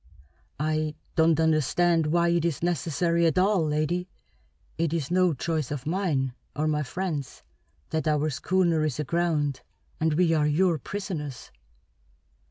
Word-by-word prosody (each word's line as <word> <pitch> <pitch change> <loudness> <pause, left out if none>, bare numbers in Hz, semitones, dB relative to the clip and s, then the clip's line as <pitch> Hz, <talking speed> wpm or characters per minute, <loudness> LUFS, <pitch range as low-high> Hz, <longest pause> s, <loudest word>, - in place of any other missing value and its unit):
"I 155 0 -1 0.2
don't 160 -1 +4
understand 160 +1 +2
why 170 +2 +2
it 170 -1 +2
is 165 -2 -1
necessary 170 +1 +1
at 160 - 0
all, 190 -1 +3
lady. 155 +4 -1 0.7
It 165 -1 0
is 160 -2 -2
no 180 -3 +3
choice 155 0 -2
of 145 -3 -5
mine, 155 -7 0 0.2
or 155 +2 0
my 150 -1 +1
friends, 150 -2 -4 0.5
that 160 0 -1
our 150 0 +1
schooner 170 +2 +1
is 150 -3 -2
aground 150 -4 0 0.4
and 160 -1 +1
we 170 0 +3
are 150 -2 +2
your 165 +2 +2
prisoners!" 160 -6 -6
160 Hz, 140 wpm, -26 LUFS, 150-175 Hz, 0.7 s, don't